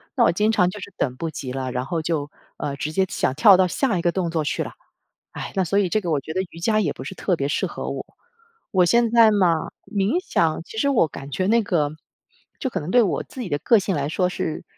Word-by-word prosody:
那 -, -, +4 dB
我 -, -, +4 dB
经 210 Hz, +5 st, +2 dB
常 180 Hz, -5 st, +3 dB
就 205 Hz, -, -8 dB
是 200 Hz, -, -8 dB
等 125 Hz, -3 st, -1 dB
不 165 Hz, +5 st, -4 dB
及 130 Hz, -5 st, -6 dB
了， 130 Hz, -1 st, -3 dB
然 125 Hz, 0 st, -2 dB
后 165 Hz, +4 st, -2 dB
就， 155 Hz, -3 st, -2 dB, 0.3 s
呃， 140 Hz, -, -3 dB
直 140 Hz, +3 st, -4 dB
接 190 Hz, +3 st, +2 dB
想 130 Hz, -, -1 dB
跳 190 Hz, +7 st, +7 dB
到 185 Hz, 0 st, +4 dB
下 225 Hz, +2 st, 0 dB
一 -, -, -1 dB
个 175 Hz, -, +2 dB
动 180 Hz, -1 st, -1 dB
作 165 Hz, -2 st, -1 dB
去 145 Hz, -, -2 dB
了。 -, -, -7 dB, 0.6 s
唉， -, -, -6 dB
那 190 Hz, -, +2 dB
所 190 Hz, +3 st, 0 dB
以 200 Hz, -3 st, +2 dB
这 215 Hz, +4 st, +1 dB
个 175 Hz, -, -4 dB
我 150 Hz, -, +2 dB
觉 155 Hz, +3 st, -7 dB
得 185 Hz, -, 0 dB
瑜 165 Hz, -, -12 dB
伽 215 Hz, +5 st, +2 dB
也 160 Hz, -8 st, 0 dB
不 130 Hz, -, -8 dB
是 135 Hz, -, -6 dB
特 185 Hz, -1 st, 0 dB
别 140 Hz, -4 st, -2 dB
适 145 Hz, -, 0 dB
合 -, -, -6 dB
我。 -, -, -5 dB, 0.7 s
我 185 Hz, -2 st, +4 dB
现 235 Hz, +4 st, +3 dB
在 230 Hz, -2 st, +6 dB
嘛 175 Hz, -6 st, +2 dB, 0.2 s
冥 200 Hz, +1 st, 0 dB
想 160 Hz, -1 st, +1 dB
其 220 Hz, -, -11 dB
实 280 Hz, -, +1 dB
我 245 Hz, -, +3 dB
感 140 Hz, -1 st, -9 dB
觉 185 Hz, +6 st, -1 dB
那 230 Hz, +3 st, +4 dB
个， 165 Hz, -8 st, 0 dB, 0.7 s
就 265 Hz, -, -2 dB
可 -, -, -2 dB
能 150 Hz, -, -6 dB
对 240 Hz, +5 st, +5 dB
我 195 Hz, -, 0 dB
自 260 Hz, -, -9 dB
己 215 Hz, -, -5 dB
的 145 Hz, -, -1 dB
个 230 Hz, +9 st, +4 dB
性 195 Hz, -1 st, -1 dB
来 145 Hz, -1 st, -1 dB
说 180 Hz, +3 st, +1 dB
是， 160 Hz, -, -4 dB
175 Hz, 290 characters per minute, -23 LUFS, 150-205 Hz, 0.7 s, 跳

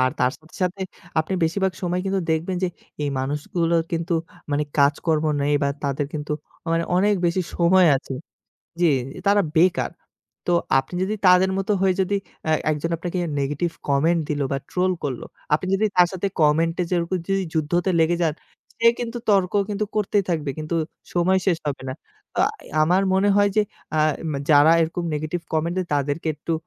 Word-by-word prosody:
আর 130 Hz, 0 st, +3 dB
তার 125 Hz, -, +3 dB
সাথে, 155 Hz, +2 st, -21 dB
সাথে 185 Hz, +2 st, -1 dB, 0.4 s
আপনি 175 Hz, +5 st, -3 dB
বেশিরভাগ 190 Hz, +3 st, 0 dB
সময় 180 Hz, 0 st, 0 dB
কিন্তু 195 Hz, 0 st, 0 dB
দেখবেন 165 Hz, +3 st, 0 dB
যে, -, -, +1 dB, 0.3 s
এই 145 Hz, -, 0 dB
মানুষগুলোর 165 Hz, +5 st, 0 dB
কিন্তু 165 Hz, +1 st, -1 dB, 0.4 s
মানে 145 Hz, +1 st, +1 dB
কাজকর্ম 150 Hz, +2 st, +2 dB, 0.2 s
নেই 145 Hz, +1 st, +1 dB
বা 140 Hz, -, +2 dB, 0.2 s
তাদের 140 Hz, +1 st, -1 dB
কিন্তু 150 Hz, 0 st, -3 dB, 0.4 s
মানে 165 Hz, 0 st, +1 dB
অনেক 205 Hz, +3 st, +3 dB
বেশি 180 Hz, +2 st, +1 dB
সময় 180 Hz, +1 st, +5 dB
আছে 135 Hz, 0 st, -6 dB, 0.7 s
জি, 175 Hz, -, +5 dB, 0.4 s
তারা 205 Hz, 0 st, +5 dB
বেকার। 180 Hz, +3 st, +3 dB, 0.6 s
তো 175 Hz, -, +2 dB, 0.3 s
আপনি 135 Hz, +6 st, -8 dB
যদি 210 Hz, +3 st, -1 dB
তাদের 185 Hz, +1 st, +6 dB
মতো 195 Hz, +2 st, -1 dB
হয়ে 190 Hz, -1 st, +3 dB
যদি 195 Hz, +2 st, 0 dB, 0.3 s
অ্যা 155 Hz, -, +2 dB, 0.2 s
একজন 150 Hz, +2 st, -2 dB
আপনাকে 175 Hz, +2 st, -3 dB, 0.2 s
নেগেটিভ 150 Hz, +5 st, -1 dB, 0.2 s
কমেন্ট 160 Hz, +5 st, +3 dB
দিলো 145 Hz, -2 st, 0 dB
বা 140 Hz, -, +1 dB
ট্রোল 185 Hz, +1 st, +1 dB
করলো, 130 Hz, -4 st, -3 dB, 0.3 s
আপনি 170 Hz, +5 st, +1 dB
যদি 210 Hz, +3 st, +1 dB
তার 180 Hz, -1 st, +6 dB
সাথে 190 Hz, +2 st, -1 dB
কমেন্ট 160 Hz, +2 st, +3 dB
এ -, -, +2 dB
যেয়ে 175 Hz, -2 st, +2 dB, 0.3 s
যদি 195 Hz, 0 st, +1 dB
যুদ্ধতে 170 Hz, +3 st, 0 dB
লেগে 165 Hz, +2 st, +3 dB
যান 155 Hz, -, +1 dB, 0.4 s
সে 230 Hz, 0 st, +4 dB
কিন্তু 240 Hz, 0 st, -3 dB
তর্ক 195 Hz, -3 st, +3 dB, 0.2 s
কিন্তু 210 Hz, +1 st, -1 dB
করতেই 205 Hz, -1 st, +1 dB
থাকবে। 155 Hz, -4 st, -1 dB
কিন্তু 155 Hz, +2 st, -3 dB, 0.4 s
সময় 185 Hz, +2 st, +3 dB
শেষ 180 Hz, -4 st, +2 dB
হবে 140 Hz, -2 st, -3 dB
না। -, -, -3 dB, 0.5 s
আ -, -, +5 dB, 0.4 s
আমার 180 Hz, +5 st, +3 dB
মনে 195 Hz, +2 st, +3 dB
হয় 205 Hz, 0 st, +4 dB
যে, 215 Hz, -, +5 dB, 0.4 s
আ -, -, +3 dB, 0.3 s
মে 140 Hz, -, -2 dB
যারা 150 Hz, +1 st, +7 dB
এরকম 165 Hz, +2 st, -1 dB
নেগেটিভ 155 Hz, +3 st, -3 dB
কমেন্ট 165 Hz, +2 st, 0 dB
দেয় 185 Hz, -2 st, -1 dB
তাদেরকে 145 Hz, +3 st, -1 dB
একটু 160 Hz, +3 st, -3 dB
170 Hz, 180 wpm, -23 LUFS, 150-185 Hz, 0.7 s, যারা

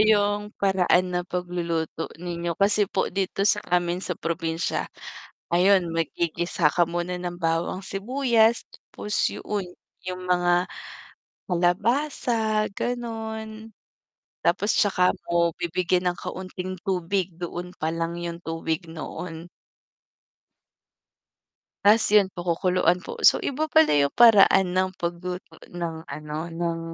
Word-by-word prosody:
yung 205 Hz, -1 st, +3 dB
paraan 185 Hz, -2 st, +2 dB
ng 180 Hz, 0 st, -2 dB
pagluluto 170 Hz, -3 st, -3 dB
ninyo. 170 Hz, -1 st, -4 dB
Kasi 200 Hz, 0 st, +3 dB
po 190 Hz, -, -1 dB
dito 195 Hz, +1 st, -1 dB
sa 210 Hz, 0 st, +3 dB
amin 175 Hz, 0 st, +1 dB
sa -, -, -4 dB
probinsya, 165 Hz, 0 st, -2 dB, 0.6 s
ayun 180 Hz, -1 st, +4 dB
maggigisa 165 Hz, 0 st, 0 dB
ka 175 Hz, -, +3 dB
muna 175 Hz, +1 st, -2 dB
ng 175 Hz, -1 st, -4 dB
bawang, 165 Hz, +3 st, -1 dB
sibuyas 230 Hz, +2 st, +2 dB
tapos 210 Hz, 0 st, -8 dB, 0.2 s
'yon, 205 Hz, -3 st, -3 dB, 0.4 s
yung 180 Hz, 0 st, -5 dB
mga 175 Hz, 0 st, +3 dB, 0.9 s
kalabasa, 220 Hz, -, +1 dB
gano'n. 220 Hz, -2 st, -5 dB, 0.8 s
Tapos 195 Hz, +5 st, +2 dB
tsaka 180 Hz, -3 st, +3 dB, 0.2 s
mo 170 Hz, -1 st, +2 dB
bibigyan 180 Hz, +1 st, 0 dB
ng 175 Hz, -, -11 dB
kaunting 185 Hz, 0 st, -6 dB
tubig, 185 Hz, -1 st, -1 dB
doon 175 Hz, 0 st, -5 dB
pa 155 Hz, -, -1 dB
lang 165 Hz, +1 st, -3 dB
yung 170 Hz, 0 st, -5 dB
tubig 165 Hz, +1 st, -3 dB
noon. 165 Hz, +1 st, -7 dB, 2.3 s
Ta's 215 Hz, +1 st, +5 dB
yun 210 Hz, -2 st, +6 dB
po 175 Hz, -, -5 dB
kukuluan 180 Hz, 0 st, +2 dB
po. -, -, -8 dB
So, -, -, +7 dB
iba 305 Hz, +3 st, -2 dB
pala 315 Hz, -, +5 dB
yung 140 Hz, -1 st, +3 dB
paraan 200 Hz, -5 st, +6 dB
ng 185 Hz, 0 st, +2 dB
pagluto 175 Hz, +1 st, -5 dB, 0.2 s
ng 170 Hz, -2 st, -4 dB
ano 150 Hz, 0 st, -6 dB
ng 170 Hz, 0 st, -2 dB
180 Hz, 120 wpm, -25 LUFS, 170-205 Hz, 2.3 s, So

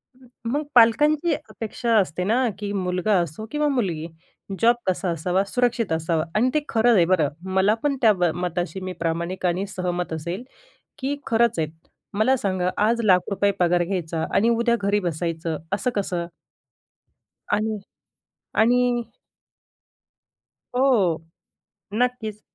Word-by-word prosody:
हं, 255 Hz, -1 st, -20 dB, 0.2 s
मग 295 Hz, +2 st, 0 dB
पालकांची 295 Hz, +8 st, +5 dB, 0.2 s
अपेक्षा 230 Hz, +1 st, -2 dB
असते 180 Hz, -3 st, +1 dB
ना, 245 Hz, +6 st, +2 dB
की 205 Hz, -1 st, -4 dB
मुलगा 185 Hz, +2 st, 0 dB
असो 170 Hz, +7 st, -5 dB
किंवा 300 Hz, 0 st, +1 dB
मुलगी, 185 Hz, -, -1 dB, 0.5 s
जॉब 235 Hz, +1 st, +5 dB
कसा 185 Hz, 0 st, 0 dB
असावा, 180 Hz, +4 st, 0 dB
सुरक्षित 240 Hz, -2 st, 0 dB
असावा 160 Hz, 0 st, 0 dB
आणि 235 Hz, +4 st, +3 dB
ते 305 Hz, -, +3 dB
खरं 230 Hz, +1 st, +4 dB
आहे 175 Hz, -, +5 dB
बरं. 165 Hz, -5 st, +2 dB, 0.2 s
मला 190 Hz, +3 st, +4 dB
पण 290 Hz, -2 st, +1 dB
त्या 220 Hz, -2 st, +6 dB
म 180 Hz, -2 st, -2 dB, 0.2 s
मताशी 175 Hz, 0 st, -2 dB
मी 185 Hz, 0 st, -4 dB
प्रामाणिक 170 Hz, +3 st, -2 dB
आणि 180 Hz, +3 st, 0 dB
सहमत 180 Hz, -3 st, -3 dB
असेल, 170 Hz, +8 st, -4 dB, 0.5 s
की 275 Hz, +2 st, -2 dB
खरंच 230 Hz, -4 st, +2 dB
आहेत. 155 Hz, -, 0 dB, 0.4 s
मला 220 Hz, +6 st, +3 dB
सांगा 185 Hz, -4 st, 0 dB, 0.2 s
आज 235 Hz, +1 st, +1 dB
लाख 185 Hz, -3 st, +3 dB
रुपये 200 Hz, 0 st, +2 dB
पगार 175 Hz, 0 st, +3 dB
घ्यायचा 170 Hz, -3 st, -2 dB
आणि 225 Hz, +3 st, +4 dB
उद्या 235 Hz, 0 st, +2 dB
घरी 200 Hz, +1 st, +2 dB
बसायचं 165 Hz, -2 st, -2 dB, 0.2 s
असं 230 Hz, +5 st, 0 dB
कसं? 180 Hz, -4 st, -2 dB, 1.2 s
आणि, 215 Hz, +1 st, 0 dB, 0.8 s
आणि 245 Hz, +3 st, +4 dB, 1.9 s
हो, 210 Hz, -12 st, +2 dB, 0.7 s
नक्कीच. 220 Hz, -3 st, -1 dB
200 Hz, 135 wpm, -23 LUFS, 175-235 Hz, 1.9 s, त्या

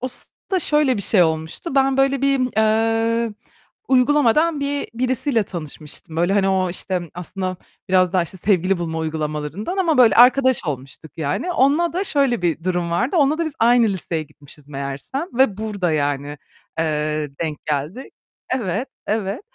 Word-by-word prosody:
o 255 Hz, -, -2 dB
sırada 375 Hz, -, -5 dB
şöyle 295 Hz, -5 st, +2 dB
bir 200 Hz, -, -3 dB
şey 190 Hz, -1 st, +4 dB
olmuştu. 160 Hz, -, -2 dB
Ben, 270 Hz, -1 st, +3 dB
böyle, 270 Hz, 0 st, +2 dB
bir, 260 Hz, -5 st, +1 dB
ııı, 225 Hz, +1 st, +1 dB, 0.5 s
uygulamadan 290 Hz, +3 st, +3 dB
bi 285 Hz, 0 st, -2 dB
birisiyle 255 Hz, -1 st, 0 dB
tanışmıştım. 155 Hz, -3 st, -8 dB
Böyle, 175 Hz, +3 st, +2 dB
hani, 195 Hz, -1 st, +2 dB
o 190 Hz, -1 st, +1 dB
işte 180 Hz, +1 st, -3 dB
aslında 185 Hz, +1 st, -4 dB, 0.3 s
biraz 185 Hz, -1 st, +3 dB
daha 185 Hz, -2 st, +3 dB
işte 170 Hz, +3 st, -8 dB
sevgili 185 Hz, -1 st, +1 dB
bulma 165 Hz, -1 st, -3 dB
uygulamalarından 155 Hz, -, -3 dB
ama 335 Hz, -6 st, +1 dB
böyle 240 Hz, -3 st, +6 dB
arkadaş 255 Hz, -1 st, +5 dB
olmuştuk 140 Hz, +1 st, -7 dB
yani. 155 Hz, -, -2 dB
Onunla 300 Hz, +5 st, +2 dB
da 370 Hz, +4 st, -1 dB
şöyle 275 Hz, -, +1 dB
bir 165 Hz, -1 st, -1 dB
durum 175 Hz, -2 st, -1 dB
vardı; 245 Hz, -, 0 dB
onunla 300 Hz, 0 st, +3 dB
da 335 Hz, -, 0 dB
biz 315 Hz, -, -3 dB
aynı 235 Hz, 0 st, +5 dB
liseye 170 Hz, -4 st, -3 dB
gitmişiz 145 Hz, 0 st, -16 dB
meğersem 140 Hz, -, -5 dB
ve 240 Hz, -5 st, +2 dB
burada, 200 Hz, -5 st, -2 dB
yani, 145 Hz, -1 st, -2 dB, 0.4 s
eee, 150 Hz, -2 st, -1 dB
denk 155 Hz, -2 st, -3 dB
geldi. 150 Hz, -, -3 dB, 0.4 s
Evet, 235 Hz, 0 st, -2 dB, 0.2 s
evet. 210 Hz, -1 st, -2 dB
200 Hz, 155 wpm, -21 LUFS, 160-260 Hz, 0.5 s, böyle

